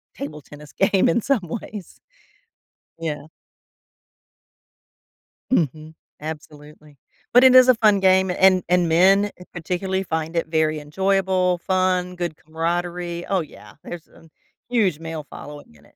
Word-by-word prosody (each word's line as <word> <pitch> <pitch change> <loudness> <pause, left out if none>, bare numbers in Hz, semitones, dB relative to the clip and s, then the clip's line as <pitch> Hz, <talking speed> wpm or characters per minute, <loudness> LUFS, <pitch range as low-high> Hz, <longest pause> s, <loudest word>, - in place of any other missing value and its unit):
table 150 +2 -7
tennis 145 +1 -14
game 195 -1 +2
in 220 - +2
some 270 -3 +1 0.2
ways. 205 -4 -10 1.0
Yeah. 150 -3 -5 2.3
Mhm, 155 - -1 0.3
absolutely. 150 -1 -10 0.4
But, 245 +1 +7
it 255 0 +7
is 255 0 +8
a 255 - +6
fun 210 -3 +3
game, 190 0 +3
and 185 0 +4
and 180 -1 +3
men, 195 +5 +4 0.2
particularly, 185 +3 -3
find 160 -1 -4
it 165 - 0
very 155 -1 0
enjoyable, 185 +3 0
fun, 185 -1 0
good 175 -3 -4
camaraderie 170 +2 -3
Oh, 195 -2 0
yeah, 155 - -13
there's 170 -2 -9
a 165 -1 -20 0.4
huge 200 -10 +1
male 160 -2 -6
following 145 - -12
in 70 - -22
it. - - -25
175 Hz, 130 wpm, -22 LUFS, 155-190 Hz, 2.3 s, is